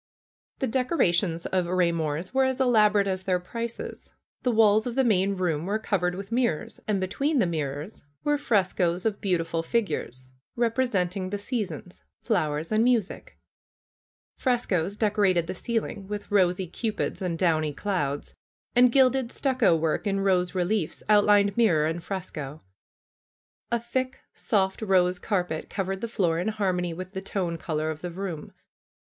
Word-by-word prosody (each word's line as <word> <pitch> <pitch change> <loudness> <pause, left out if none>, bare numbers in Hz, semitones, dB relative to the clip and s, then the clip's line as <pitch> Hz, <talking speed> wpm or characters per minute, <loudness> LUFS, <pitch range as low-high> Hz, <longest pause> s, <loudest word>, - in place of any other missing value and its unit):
The - - -1
decorations 205 - +1
of 185 -2 0
Eaymor's 170 - 0
were 265 0 +3
as 260 0 -1
elaborate 210 -5 +4
as 190 -1 -2
their 185 -1 +1
prices. 230 +6 -6 0.3
The 250 - +1
walls 220 0 +4
of 240 - -4
the 265 - +3
main 200 -4 +2
room 170 -3 -1
were 205 +2 +1
covered 180 -5 0
with 195 +3 -7
mirrors, 235 -10 -1
and 210 -2 +1
between 275 - 0
the 235 - +4
mirrors 155 +2 -4 0.2
were 295 -1 +1
frescoes 185 -7 +1
of 215 -2 -1
beautiful 170 -3 0
figures, 160 - -2 0.2
representing 220 -6 0
the 205 - -2
seasons, 200 - -5 0.2
fiowers 160 -7 -1
and 215 +1 +3
music. 235 -5 0 1.0
Frescoes 205 - 0
decorated 200 -5 +2
the - - -4
ceiling 210 -1 -3
with 205 0 -6
rosy 185 -2 +3
Cupids 215 +4 -3
and 175 -3 -2
downy 160 -4 +2
clouds. 145 -4 -2 0.4
And 245 0 +6
gilded 260 -1 +3
stucco 260 - +2
work 160 +5 0
in 195 -1 0
rose 185 -1 +1
reliefs 180 -1 -1
outlined 205 -1 +5
mirror 180 -10 +3
and 165 +2 -2
fresco. 160 -6 -6 1.1
A 235 - +2
thick, 255 +3 -3
soft 190 -2 0
rose 185 -3 +2
carpet 180 -6 -2
covered 195 -1 -3
the 230 - -2
fioor 175 -7 0
in 180 - -2
harmony 185 -5 0
with 185 +2 -7
the 190 -1 -5
tone 180 -4 -2
color 155 -1 -2
of 155 0 -8
the 180 - -4
room. 175 -3 -6
195 Hz, 150 wpm, -26 LUFS, 175-220 Hz, 1.1 s, And